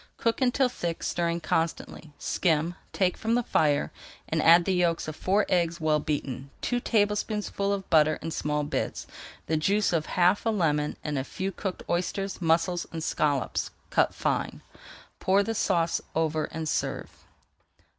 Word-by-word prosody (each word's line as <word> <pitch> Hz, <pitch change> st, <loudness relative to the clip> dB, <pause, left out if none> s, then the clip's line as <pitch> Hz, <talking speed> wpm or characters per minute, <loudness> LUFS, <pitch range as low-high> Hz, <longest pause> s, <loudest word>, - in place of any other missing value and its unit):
Cook 230 Hz, +3 st, 0 dB
until 260 Hz, +1 st, +3 dB
thick, 170 Hz, -9 st, -4 dB
stirring 170 Hz, 0 st, -1 dB
constantly, 160 Hz, 0 st, -2 dB
skim, 165 Hz, -1 st, 0 dB, 0.2 s
take 185 Hz, -2 st, +1 dB
from 225 Hz, +1 st, 0 dB
the 245 Hz, -, +1 dB
fire, 150 Hz, -8 st, +1 dB, 0.4 s
and 160 Hz, 0 st, 0 dB
add 170 Hz, +2 st, +7 dB
the 190 Hz, -, +1 dB
yolks 170 Hz, -3 st, +1 dB
of 155 Hz, -, -5 dB
four 195 Hz, +6 st, +1 dB
eggs 170 Hz, -1 st, +1 dB
well 155 Hz, -1 st, +2 dB
beaten, 140 Hz, -3 st, -3 dB
two 245 Hz, -, -1 dB
tablespoonfuls 210 Hz, -2 st, 0 dB
of 195 Hz, -1 st, -7 dB
butter 155 Hz, -1 st, +5 dB
in 165 Hz, -, -5 dB
small 150 Hz, -1 st, -1 dB
bits, 145 Hz, -, -3 dB, 0.4 s
the 160 Hz, -, 0 dB
juice 200 Hz, +5 st, +2 dB
of 160 Hz, -2 st, 0 dB
half 180 Hz, +3 st, +3 dB
a 225 Hz, -, +1 dB
lemon, 150 Hz, -8 st, 0 dB
and 150 Hz, -3 st, -2 dB
a -, -, -2 dB
few 190 Hz, +7 st, -4 dB
cooked 190 Hz, -1 st, -5 dB
oysters, 190 Hz, +3 st, -2 dB
mussels, 170 Hz, +1 st, +1 dB
and 160 Hz, -1 st, -5 dB
scallops 145 Hz, -5 st, 0 dB, 0.2 s
cut -, -, +2 dB
fine. -, -, -2 dB, 0.6 s
Pour 195 Hz, +2 st, +3 dB
the 225 Hz, -, -2 dB
sauce 170 Hz, -6 st, +1 dB
over 160 Hz, -1 st, +1 dB
and 160 Hz, 0 st, -5 dB
serve. -, -, -2 dB
170 Hz, 160 wpm, -27 LUFS, 155-195 Hz, 0.6 s, add